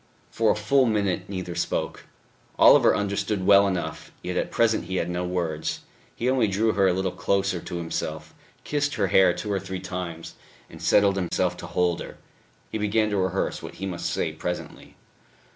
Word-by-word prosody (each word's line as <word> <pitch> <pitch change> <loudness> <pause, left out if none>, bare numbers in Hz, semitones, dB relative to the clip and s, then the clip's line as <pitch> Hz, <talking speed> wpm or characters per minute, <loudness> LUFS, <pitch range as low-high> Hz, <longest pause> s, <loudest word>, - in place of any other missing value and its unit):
For 115 -1 +2
a - - +3
full 125 +5 +3
minute 100 -4 0
neither 90 -3 -4
spoke. - - -3 0.5
Oliver - - +7
understood 100 -1 -1
well 100 0 +6
enough, 85 -5 -4
yet - - -3
at - - -1
present 115 -4 +1
he 95 +2 -4
had 90 -1 -1
no 90 +1 -2
words. 85 -4 -2 0.3
He 120 - -2
only 130 -3 +3
drew 105 +3 +1
her 100 -1 +3
a 90 - +3
little 95 0 -1
closer 95 -1 0
to 90 - -7
himself, 85 -1 -4 0.3
kissed 145 -1 -1
her 100 -3 0
hair 95 -2 +5
two 90 +4 -4
or 100 - 0
three 95 0 -6
times, 90 -2 -6 0.4
and - - -12
settled 100 -1 +4
himself 90 -3 0
to - - -8
hold 90 -2 0
her. - - -9 0.5
He 110 - -3
began 105 +1 +1
to 100 - 0
rehearse 95 0 -1
what - - -9
he 95 - -5
must 90 -3 -3
say - - -1
presently. 90 0 -6
95 Hz, 185 wpm, -25 LUFS, 90-105 Hz, 0.5 s, Oliver